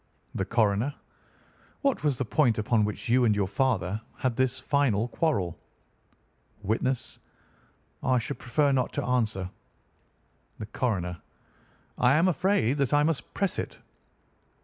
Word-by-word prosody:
"The 95 - -1
Coroner: 115 +5 +1 0.9
What 275 - +1
was 145 -4 +1
the 130 - -1
point 120 -2 +2
upon 110 0 +2
which 105 - -5
you 125 +2 +4
and 110 -2 +3
your 100 -1 +1
father 105 -4 0 0.2
had 130 -3 -1
this 130 0 +1
final 130 -7 +1
quarrel? 110 - 0 1.0
"Witness: 120 +5 -1 0.8
I 130 -1 +2
should 135 +4 -3
prefer 140 +4 +1
not 130 -2 0
to - - -2
answer. 110 -7 0 1.1
"The 110 - -5
Coroner: 95 -7 -2 0.8
I 125 +1 +5
am 165 +5 +4
afraid 175 - +1
that 140 0 +2
I 145 - +4
must 160 -2 -1
press 195 -3 0
it. - - -5
125 Hz, 135 wpm, -27 LUFS, 105-140 Hz, 1.1 s, I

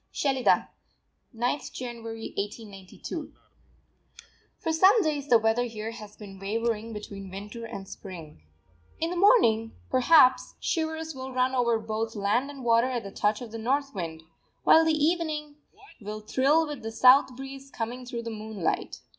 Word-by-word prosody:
SHELIDAH, 270 -3 +2 0.7
9_th 245 +5 -1
January_ 230 -2 -6
1892. 200 -2 -6 1.2
For 325 - -2
some 380 +8 +6
days 295 -3 -1
the 240 - +7
weather 225 +2 +1
here 225 -1 -5
has 215 -3 -11
been 195 -3 -11
wavering 225 +2 -2
between 200 -2 -8
Winter 205 +5 -7
and 195 -4 -7
Spring. 170 - -10 0.6
In 330 +1 -1
the - - -3
morning, 230 - +4 0.2
perhaps, 255 0 +5
shivers 320 -1 -2
will 265 0 -7
run 255 +1 +1
over 235 -3 +2
both 220 +1 -3
land 210 +7 +1
and 275 -2 -9
water 230 +1 +4
at 245 -2 -2
the 195 - -8
touch 210 +3 0
of 230 - -9
the 225 - -6
north 275 +4 0
wind; 165 -4 -5 0.4
while 325 - +7
the 320 - +3
evening 305 -2 -1 0.4
will 210 +1 -6
thrill 275 +8 +2
with 295 -4 -6
the 225 0 -5
south 255 +2 +6
breeze 270 +1 -9
coming 245 +1 -5
through 240 -1 -5
the 230 - -5
moonlight. 215 -4 -3
235 Hz, 155 wpm, -27 LUFS, 215-275 Hz, 1.2 s, the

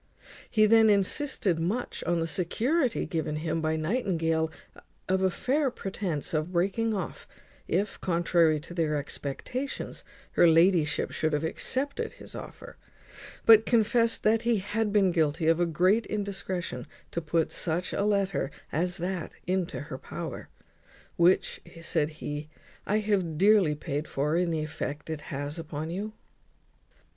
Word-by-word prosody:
He 215 -2 +4
then 220 0 +6
insisted 200 - +1
much 205 +10 -2
on 175 -1 +1
the - - +1
security 230 - 0
given 160 -2 -2
him 160 +1 -2
by 160 0 +1
Nightingale 160 -3 0 0.6
of 190 0 +1
a 190 - +4
fair 270 - +1
pretence 190 - -4
for 155 - +2
breaking 190 +7 0
off, 190 -4 -5 0.4
if, 195 +4 -1
contrary 170 -3 +3
to 175 - -10
their 160 -3 0
expectations, 150 - -4 0.3
her 175 - +5
ladyship 165 -1 +3
should 155 -1 -1
have 150 +1 0
accepted 265 - -2
his - - -12
offer; - - -9 0.7
but 225 -1 +8
confest 230 0 +2
that 220 +1 +4
he 235 -1 +2
had 210 +2 -1
been 200 -3 +4
guilty 160 -1 +1
of 165 +1 +4
a 175 - +2
great 185 +8 +2
indiscretion 195 -3 -3 0.2
to 170 - -2
put 165 0 0
such 175 +2 -1
a - - 0
letter 200 -7 +1 0.2
as 175 +3 0
that 180 -1 -3
into 185 -3 -1
her 130 -2 -7
power, - - -6 0.7
"which," 175 +2 +3 0.2
said 155 -2 +1
he, 150 -1 -6 0.4
"I 210 - +2
have 190 -7 0
dearly 195 -4 +5
paid 150 0 -3
for, 150 +3 0
in 175 0 +2
the 160 -2 -1
effect 150 0 -5
it 155 -1 -4
has 145 +3 -4
upon 155 0 -5
you." 205 +4 -4
175 Hz, 145 wpm, -28 LUFS, 160-210 Hz, 0.7 s, but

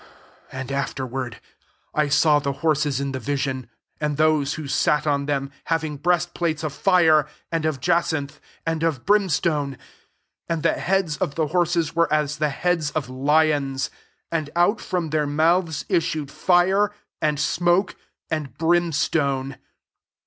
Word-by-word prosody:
17 130 - -7
And 130 +1 -6
afterward 130 -3 -3 0.5
I 150 -1 +1
saw 150 +1 +4
the 140 -1 -2
horses 150 -3 +2
in 140 0 -2
the 130 - -4
vision, 130 -1 -2 0.3
and 150 -2 -1
those 155 -2 +2
who 155 -2 -6
sat 145 +2 +1
on 140 -1 0
them, 140 -1 -1
having 160 -3 -1
breast 175 +2 +1
plates 160 -2 -1
of 155 -3 -2
fire, 160 -6 +4 0.2
and 165 -2 -1
of 155 -4 -1
jacinth, 160 -2 0 0.3
and 165 -1 -1
of 160 -7 -1
brim 205 -1 +3
stone: 145 -4 0 0.7
and 165 -2 -1
the 165 - +3
heads 185 -5 0
of 170 -7 -2
the 155 -2 0
horses 175 -1 +1
vfere 170 0 +2
as 150 -1 0
the 150 0 +1
heads 165 +1 0
of 150 -5 -3
lions; 140 0 +1 0.4
and 160 -3 -1
out 175 +6 +3
from 175 -4 -2
their 150 -1 +1
mouths 160 +1 +1
issued 155 -4 -1
fire, 190 +3 +3 0.3
and 150 -2 +1
smoke, 175 +5 +1 0.4
and 145 -6 -3
brimstone. 145 -5 +1
155 Hz, 150 wpm, -23 LUFS, 140-170 Hz, 0.7 s, saw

